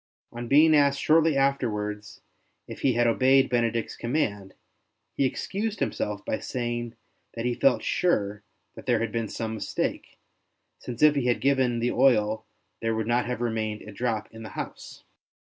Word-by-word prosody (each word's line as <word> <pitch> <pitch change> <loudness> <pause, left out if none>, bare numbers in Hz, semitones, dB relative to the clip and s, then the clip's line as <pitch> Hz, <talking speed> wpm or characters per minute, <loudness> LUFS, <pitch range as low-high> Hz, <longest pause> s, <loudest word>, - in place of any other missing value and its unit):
On 120 0 -6
being 155 +4 +6
asked 140 -1 +3
shortly 160 -1 +3
afterwards 105 -7 -1 0.5
if - - -8
he 130 - +3
had 120 +1 +2
obeyed 130 +3 +4
Benedict's 115 -2 0
command, 110 -7 -2 0.6
he 140 - +1
excused 210 - -3
himself 105 -1 -2
by - - -2
saying 120 -1 -4 0.4
that 115 0 -4
he 125 - +1
felt 130 +2 +2
sure 105 - 0 0.3
that - - -12
there 120 -2 +3
had 115 -1 -2
been 115 -1 -2
some 110 +1 -4
mistake, 110 - -3 0.6
since 125 +2 -5
if 150 -1 +7
he 140 -4 0
had 120 - +2
given 130 -3 +2
the 120 +1 0
oil 110 -4 +2 0.3
there 115 0 0
would 110 -1 -1
not 120 +2 +1
have 125 -1 -3
remained 110 -2 -2
a 105 - -10
drop 110 0 -2
in 110 - -11
the 110 - -8
house. - - -7
120 Hz, 165 wpm, -26 LUFS, 110-135 Hz, 0.6 s, if